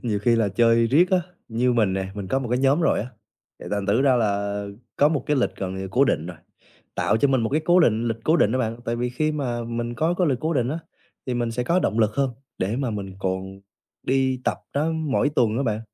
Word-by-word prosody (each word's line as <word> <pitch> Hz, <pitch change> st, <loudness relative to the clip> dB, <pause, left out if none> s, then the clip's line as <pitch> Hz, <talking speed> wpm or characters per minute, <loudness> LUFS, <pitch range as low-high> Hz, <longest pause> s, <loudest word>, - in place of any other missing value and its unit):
Nhiều 110 Hz, -4 st, -1 dB
khi 115 Hz, 0 st, +3 dB
là 110 Hz, -3 st, +2 dB
chơi 115 Hz, +3 st, +3 dB
riết 170 Hz, +10 st, +3 dB
á, 185 Hz, -2 st, +3 dB, 0.3 s
như 120 Hz, +2 st, +1 dB
mình 110 Hz, -5 st, +2 dB
nè, 95 Hz, 0 st, -2 dB
mình 100 Hz, -2 st, -6 dB
có 135 Hz, -, +1 dB
một 130 Hz, -3 st, -4 dB
cái 125 Hz, -, +1 dB
nhóm 135 Hz, +4 st, +3 dB
rồi 165 Hz, -, +2 dB
á, 110 Hz, -, -4 dB, 0.5 s
thì -, -, -9 dB
thành 100 Hz, -1 st, -2 dB
thử 110 Hz, +6 st, +2 dB
ra 135 Hz, -2 st, +4 dB
là 100 Hz, -2 st, -1 dB, 0.3 s
có 145 Hz, -, +5 dB
một 150 Hz, -3 st, -1 dB
cái 150 Hz, -, +1 dB
lịch 125 Hz, -, 0 dB
gần 95 Hz, -1 st, -4 dB
như 95 Hz, -, -5 dB
là 95 Hz, -, -5 dB
cố 130 Hz, +7 st, +4 dB
định 80 Hz, -, 0 dB
rồi, 90 Hz, -1 st, -8 dB, 0.6 s
tạo 105 Hz, -, +1 dB
cho 140 Hz, +5 st, +2 dB
mình 130 Hz, -2 st, +2 dB
một 110 Hz, -, 0 dB
cái 155 Hz, +3 st, +1 dB
cố 175 Hz, +1 st, +5 dB
định 115 Hz, -7 st, +3 dB
lịch 115 Hz, -, -1 dB
cố 160 Hz, +2 st, +4 dB
định 105 Hz, -, +3 dB
đó 130 Hz, -, 0 dB
bạn. 115 Hz, -3 st, -1 dB
Tại 115 Hz, -, -2 dB
vì 120 Hz, +1 st, -2 dB
khi 155 Hz, +5 st, -1 dB
mà 125 Hz, -5 st, -2 dB
mình 120 Hz, +1 st, -4 dB
có 160 Hz, +6 st, +1 dB
cái 180 Hz, -, +3 dB
lịch 130 Hz, -4 st, 0 dB
cố 160 Hz, +1 st, -1 dB
định 125 Hz, -3 st, +1 dB
á, 155 Hz, +5 st, -2 dB, 0.5 s
thì 125 Hz, -, -2 dB
mình 120 Hz, -1 st, -1 dB
sẽ 125 Hz, +2 st, -2 dB
có 170 Hz, +8 st, +2 dB
động 115 Hz, -10 st, 0 dB
lực 110 Hz, -1 st, +3 dB
hơn 135 Hz, -2 st, +1 dB, 0.3 s
để 100 Hz, +5 st, -1 dB
mà 130 Hz, -2 st, -1 dB
mình 100 Hz, -3 st, -5 dB
còn 95 Hz, 0 st, -4 dB, 0.4 s
đi 130 Hz, -1 st, +1 dB
tập -, -, 0 dB
đó 150 Hz, +3 st, 0 dB
mỗi 155 Hz, -3 st, 0 dB
tuần 115 Hz, -6 st, +1 dB
á 135 Hz, -, 0 dB
bạn. 110 Hz, -4 st, -1 dB
120 Hz, 270 wpm, -23 LUFS, 105-140 Hz, 0.6 s, có